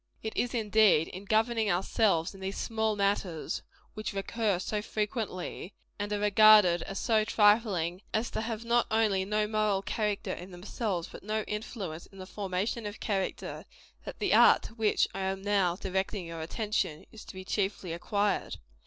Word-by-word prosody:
It 220 Hz, -, -4 dB
is, 245 Hz, 0 st, -1 dB
indeed, 215 Hz, -7 st, +4 dB
in 190 Hz, +2 st, -9 dB
governing 220 Hz, +1 st, +2 dB
ourselves 185 Hz, -1 st, +1 dB
in 195 Hz, -, -13 dB
these 190 Hz, +1 st, -4 dB
small 220 Hz, -1 st, -1 dB
matters 200 Hz, -5 st, -1 dB, 0.3 s
which 215 Hz, -1 st, -5 dB
recur 200 Hz, 0 st, 0 dB
so 210 Hz, +3 st, -2 dB
frequently, 210 Hz, -4 st, -4 dB, 0.2 s
and 205 Hz, +1 st, -3 dB
are 210 Hz, -, +1 dB
regarded 210 Hz, -4 st, +6 dB
as 195 Hz, -, -6 dB
so 220 Hz, -1 st, +2 dB
trifling 205 Hz, -5 st, +2 dB
as 225 Hz, +2 st, -1 dB
to -, -, -2 dB
have 225 Hz, 0 st, -4 dB
not 235 Hz, +1 st, +2 dB
only 210 Hz, -4 st, +2 dB
no 210 Hz, +1 st, +1 dB
moral 210 Hz, -2 st, 0 dB
character 210 Hz, -1 st, -2 dB
in 180 Hz, +2 st, -8 dB
themselves, 185 Hz, 0 st, -4 dB
but -, -, -10 dB
no 215 Hz, +1 st, -2 dB
influence 205 Hz, -7 st, -5 dB
in 195 Hz, -, -17 dB
the 185 Hz, -, -8 dB
formation 200 Hz, +3 st, -3 dB
of 205 Hz, +1 st, -8 dB
character 195 Hz, -3 st, -3 dB, 0.4 s
that -, -, -8 dB
the -, -, +1 dB
art -, -, +6 dB
to -, -, -9 dB
which 220 Hz, -2 st, +2 dB
I 195 Hz, -, -5 dB
am 190 Hz, 0 st, -2 dB
now 195 Hz, -4 st, +2 dB
directing 190 Hz, 0 st, -2 dB
your 165 Hz, -1 st, -6 dB
attention, 170 Hz, -3 st, -2 dB
is 220 Hz, -, -11 dB
to -, -, -11 dB
be 185 Hz, 0 st, -8 dB
chiefly 190 Hz, -3 st, -2 dB
acquired. 200 Hz, +4 st, -1 dB
205 Hz, 170 wpm, -30 LUFS, 190-220 Hz, 0.4 s, regarded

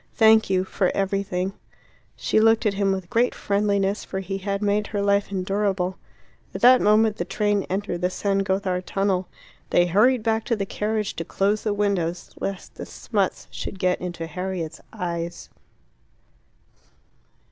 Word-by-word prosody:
"Thank 220 Hz, -2 st, +5 dB
you 185 Hz, -1 st, +2 dB
for 190 Hz, -1 st, 0 dB
everything." 195 Hz, -1 st, -1 dB, 0.6 s
She -, -, +1 dB
looked 225 Hz, +1 st, +4 dB
at 210 Hz, -, +2 dB
him 195 Hz, 0 st, +1 dB
with 190 Hz, -2 st, -3 dB
great 240 Hz, +5 st, +1 dB
friendliness, 200 Hz, 0 st, 0 dB
for 190 Hz, -, -4 dB
he 195 Hz, +1 st, -4 dB
had 200 Hz, +1 st, -2 dB
made 210 Hz, +1 st, +1 dB
her 205 Hz, -2 st, -2 dB
life 200 Hz, 0 st, +2 dB
endurable. 190 Hz, -1 st, -1 dB, 0.6 s
At -, -, -4 dB
that 255 Hz, +1 st, +7 dB
moment 215 Hz, +1 st, +4 dB
the -, -, -1 dB
train 205 Hz, -2 st, 0 dB
entered 190 Hz, -2 st, -2 dB
the 180 Hz, -, +2 dB
San 195 Hz, +1 st, 0 dB
Gothard 190 Hz, -2 st, -1 dB
tunnel. 195 Hz, -2 st, 0 dB, 0.4 s
They 175 Hz, -, +4 dB
hurried 215 Hz, +7 st, +3 dB
back 225 Hz, 0 st, +1 dB
to 235 Hz, -, +1 dB
the 200 Hz, -2 st, -2 dB
carriage 210 Hz, +1 st, -2 dB
to 165 Hz, -, -2 dB
close 200 Hz, +4 st, 0 dB
the 215 Hz, -, 0 dB
windows 185 Hz, -4 st, -1 dB
lest 195 Hz, -1 st, -5 dB
the -, -, -7 dB
smuts -, -, -2 dB
should -, -, -6 dB
get 180 Hz, -1 st, +1 dB
into 175 Hz, -2 st, -4 dB
Harriet's 180 Hz, -1 st, -5 dB
eyes. 170 Hz, -4 st, -4 dB
195 Hz, 160 wpm, -24 LUFS, 185-210 Hz, 0.6 s, that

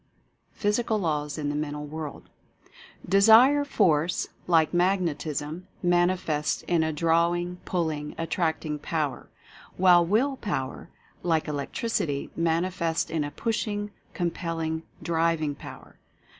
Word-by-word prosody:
PHYSICAL 215 Hz, +2 st, 0 dB
LAWS 150 Hz, -5 st, -1 dB
IN 145 Hz, -2 st, -2 dB
THE 145 Hz, -, -2 dB
MENTAL 150 Hz, 0 st, -3 dB
WORLD. 155 Hz, 0 st, -7 dB, 0.8 s
Desire 225 Hz, +9 st, +6 dB
Force, 175 Hz, -, +1 dB, 0.2 s
like 165 Hz, -2 st, +3 dB
Magnetism, 170 Hz, -2 st, -1 dB, 0.2 s
manifests 175 Hz, -4 st, +1 dB
in 170 Hz, -2 st, +1 dB
a 160 Hz, 0 st, +1 dB
draw 165 Hz, +2 st, +2 dB
ing, 175 Hz, +1 st, -4 dB
pulling, 155 Hz, -4 st, -2 dB
attracting 160 Hz, -2 st, -1 dB
power; 150 Hz, -2 st, -3 dB, 0.5 s
while 180 Hz, -2 st, +6 dB
Will 240 Hz, +10 st, +1 dB
Power, 135 Hz, -, -4 dB, 0.3 s
like 165 Hz, -3 st, +1 dB
Electricity, 145 Hz, 0 st, -2 dB
manifests 165 Hz, 0 st, 0 dB
in 160 Hz, -2 st, 0 dB
a 145 Hz, -, -3 dB
pushing, 205 Hz, +4 st, -2 dB, 0.2 s
compelling, 165 Hz, -2 st, -2 dB, 0.2 s
driv 165 Hz, 0 st, +1 dB
ing 145 Hz, -1 st, -1 dB
power. 140 Hz, -, -12 dB
165 Hz, 115 wpm, -26 LUFS, 155-185 Hz, 0.8 s, Desire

